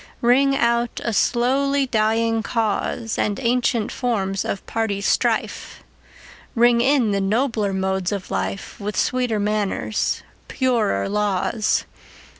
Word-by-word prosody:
Ring 270 +3 +4
out 235 -1 +1
a 230 - -1
slowly 270 +6 +2
dying 225 -1 +1
cause, 225 0 -2
And 205 +2 0
ancient 240 -2 +1
forms 195 -6 -1
of 195 - -4
party 220 -3 -2
strife; 200 - -1 0.7
Ring 235 0 +4
in 260 -4 +3
the 200 0 0
nobler 215 0 0
modes 190 -1 -1
of 200 -3 -5
life, 95 +1 -4
With 205 -1 -4
sweeter 250 -4 0
manners, 210 0 -1 0.2
purer 235 - 0
laws. 210 +1 0
225 Hz, 115 wpm, -22 LUFS, 200-245 Hz, 0.7 s, Ring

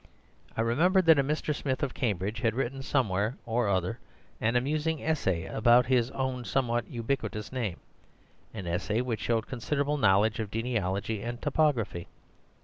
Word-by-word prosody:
I - - +2
remembered 170 - +3
that 160 -3 +7
a - - +4
Mr. 150 +2 -1
Smith 140 -1 -2
of 135 - -1
Cambridge 105 -2 -1
had 115 -3 +1
written 135 +1 -2
somewhere 110 -5 0
or 115 -1 0
other 95 +5 0 0.4
an 115 +2 +1
amusing 150 +5 0
essay 95 - 0
about 120 +2 +4
his 125 -1 +2
own 130 -2 -2
somewhat 120 -2 0
ubiquitous 115 -3 -3
name— 115 -9 -3 0.7
an 95 - -7
essay 90 +7 -1
which 115 -4 -3
showed 115 -1 0
considerable 140 +4 -1
knowledge 105 0 +3
of 110 -2 -3
genealogy 110 -2 -2
and 120 +1 -4
topography. 140 - 0
120 Hz, 150 wpm, -29 LUFS, 110-135 Hz, 0.7 s, that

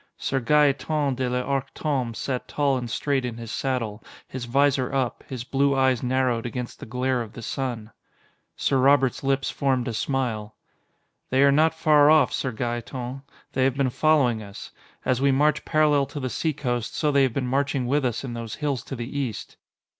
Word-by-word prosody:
Sir 135 - -1
Gaeton 145 +1 +2
de 130 0 -2
l'Arc 130 +2 -2
Tombé 130 -7 -1
sat 130 +1 -3
tall 140 -2 +1
and 120 -2 -3
straight 135 +3 0
in 120 -2 -4
his 115 -2 -7
saddle, 115 -5 -2 0.2
his 130 -2 -6
visor 135 0 +2
up, 130 -3 -1
his 130 -4 -5
blue 140 +2 +1
eyes 130 -3 +2
narrowed 125 -2 +1
against 125 0 -6
the - - -9
glare 125 +2 0
of 110 -3 -7
the 115 - -9
sun. 120 -4 -4 0.6
Sir 135 - +1
Robert's 135 0 +3
lips 135 0 0
formed 130 -3 0
a 120 - -2
smile. 110 -4 -2 0.7
"They 130 +2 +3
are 140 - +6
not 155 +3 +3
far 150 -2 +5
off, 155 -6 +5
Sir 130 - -1
Gaeton. 120 +2 -4 0.3
They 130 - +1
have 135 0 +1
been 135 -2 +1
following 135 -7 +2
us. 100 -1 -10 0.3
As 130 0 +1
we 140 0 +4
march 150 +2 +2
parallel 150 -3 +3
to 145 - -6
the 130 -2 -3
seacoast, 125 -7 -2
so 150 -2 +1
they 140 -1 +4
have 130 -3 +2
been 130 0 -1
marching 135 0 0
with 140 +3 +1
us 120 -1 -1
in 125 -3 -5
those 115 -2 -5
hills 145 -5 -2
to 135 - -6
the 120 +2 -6
east." 125 -7 -4
130 Hz, 190 wpm, -25 LUFS, 120-140 Hz, 0.7 s, are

